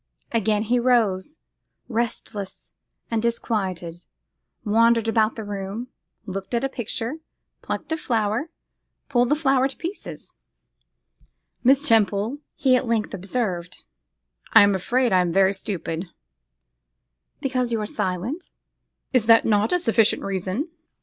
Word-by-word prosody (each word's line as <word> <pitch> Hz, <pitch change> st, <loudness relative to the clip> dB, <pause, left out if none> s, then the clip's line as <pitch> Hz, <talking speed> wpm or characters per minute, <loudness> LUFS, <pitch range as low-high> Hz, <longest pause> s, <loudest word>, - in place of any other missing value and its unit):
Again 215 Hz, -2 st, +1 dB
he 240 Hz, +3 st, +2 dB
rose, 235 Hz, +1 st, +2 dB, 0.5 s
restless 220 Hz, -4 st, -4 dB, 0.4 s
and 225 Hz, -1 st, +1 dB
disquieted, 190 Hz, -7 st, -2 dB, 0.6 s
wandered 230 Hz, +1 st, +4 dB
about 220 Hz, -1 st, +2 dB
the 220 Hz, -, -5 dB
room, 205 Hz, +4 st, -5 dB, 0.4 s
looked 195 Hz, +3 st, -4 dB
at 235 Hz, -, 0 dB
a 270 Hz, -, +1 dB
picture, 240 Hz, +2 st, -4 dB, 0.4 s
plucked -, -, -5 dB
a 320 Hz, -, +1 dB
flower, 230 Hz, +1 st, -1 dB, 0.6 s
pulled 245 Hz, -2 st, +3 dB
the 295 Hz, -, +4 dB
flower 270 Hz, -3 st, +3 dB
to 270 Hz, -, -11 dB
pieces. 355 Hz, +5 st, -7 dB, 1.3 s
'Miss 270 Hz, +4 st, +4 dB
Temple,' 220 Hz, +3 st, +2 dB, 0.2 s
he 260 Hz, -2 st, +3 dB
at 255 Hz, -, 0 dB
length 225 Hz, -2 st, 0 dB
observed, 185 Hz, -3 st, -3 dB, 0.7 s
'I -, -, +10 dB
am 200 Hz, 0 st, +4 dB
afraid 240 Hz, +5 st, +1 dB
I 185 Hz, -, +5 dB
am 175 Hz, -1 st, 0 dB
very 195 Hz, +2 st, +4 dB
stupid!' 185 Hz, -3 st, -4 dB, 1.3 s
'Because 255 Hz, -3 st, -1 dB
you 230 Hz, -, +1 dB
are 210 Hz, -, -2 dB
silent?' 210 Hz, -, -3 dB, 0.7 s
'Is 240 Hz, -4 st, +3 dB
not 225 Hz, 0 st, +7 dB
that 215 Hz, 0 st, +2 dB
a 360 Hz, -, +3 dB
sufficient 225 Hz, -7 st, +3 dB
reason? 195 Hz, -, -2 dB
225 Hz, 130 wpm, -24 LUFS, 195-250 Hz, 1.3 s, I